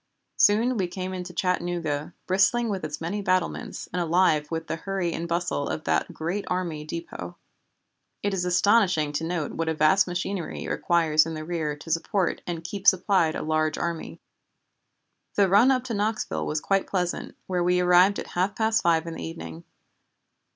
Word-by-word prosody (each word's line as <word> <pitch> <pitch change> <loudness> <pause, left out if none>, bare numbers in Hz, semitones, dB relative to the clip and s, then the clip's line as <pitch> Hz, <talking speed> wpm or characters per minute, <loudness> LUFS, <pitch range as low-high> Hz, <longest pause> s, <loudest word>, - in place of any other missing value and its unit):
Soon 225 +4 +4
we 190 -3 0
came 185 +1 -5
into 180 -1 -5
Chattanooga, 175 -4 -2
bristling 195 +6 +2
with 195 -4 -3
its 150 -1 -4
many 175 +6 -3
battlements, 185 -2 -1
and 180 - 0
alive 160 -3 +2
with 165 0 -3
the - - -3
hurry 190 -1 -2
and 170 - -4
bustle 170 -4 -1
of 155 - -3
that - - 0
great 175 +6 -3
army 175 -4 -2
dépôt. 155 - -6 0.9
It 205 0 0
is 185 -2 -1
astonishing 180 -3 +3
to 150 +2 -2
note 165 -3 -2
what 165 0 -2
a 160 - -1
vast 155 +6 +4
machinery 180 0 -3
it - - -5
requires 160 -2 +3
in 165 - -4
the 155 0 -6
rear 160 -3 -2
to 150 +3 -9
support 170 +3 0
and 170 -2 -4
keep 195 +3 -5
supplied 185 -4 +4
a - - -3
large 155 0 0
army. 170 -1 -4 1.2
"The 200 -1 +4
run 205 +7 +5
up 255 -2 +2
to 250 -2 -4
Knoxville 215 +1 -1
was 150 0 -1
quite 195 -1 +1
pleasant, 180 -2 -2
where 180 -2 -1
we 180 +1 +3
arrived 180 +3 +5
at - - -4
half 185 +3 -1
past 220 +1 +2
five 165 -1 +2
in 165 - -5
the - - -7
evening. 80 0 -8
175 Hz, 180 wpm, -26 LUFS, 160-195 Hz, 1.2 s, run